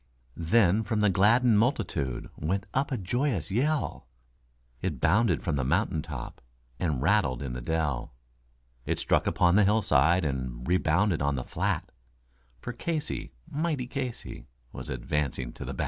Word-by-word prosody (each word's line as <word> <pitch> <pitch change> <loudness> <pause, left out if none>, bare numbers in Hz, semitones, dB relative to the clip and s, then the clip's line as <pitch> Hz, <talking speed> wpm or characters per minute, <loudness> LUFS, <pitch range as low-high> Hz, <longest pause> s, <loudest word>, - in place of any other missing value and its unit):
Then 95 +4 +3
from 110 -1 -1
the 105 -2 +4
gladdened 110 +4 +4
multitude 85 - -1
went 95 +6 -2
up 140 +2 0
a 130 - 0
joyous 105 - -1
yell, 140 - 0 0.7
It 85 -8 -2
bounded 95 - +3
from 80 -6 0
the 70 - 0
mountain 85 - +1
top, 65 -5 -7 0.4
and 75 -7 -1
rattled 80 -9 +2
in 65 -3 -4
the 60 - -5
dell, 75 -4 -2 0.7
It - - -1
struck - - +1
upon 90 +1 +3
the 105 - +6
hillside, 90 -5 +3
and 65 -3 -3
rebounded 90 0 +2
on 70 0 +1
the 65 - -3
flat; - - -2 0.7
For 120 - -5
Casey, 150 - -3
mighty 150 -3 -1
Casey, 130 -1 -6 0.2
was - - -8
advancing 70 +3 -2
to - - -8
the - - -4
bat. - - -8
90 Hz, 150 wpm, -28 LUFS, 70-115 Hz, 0.7 s, the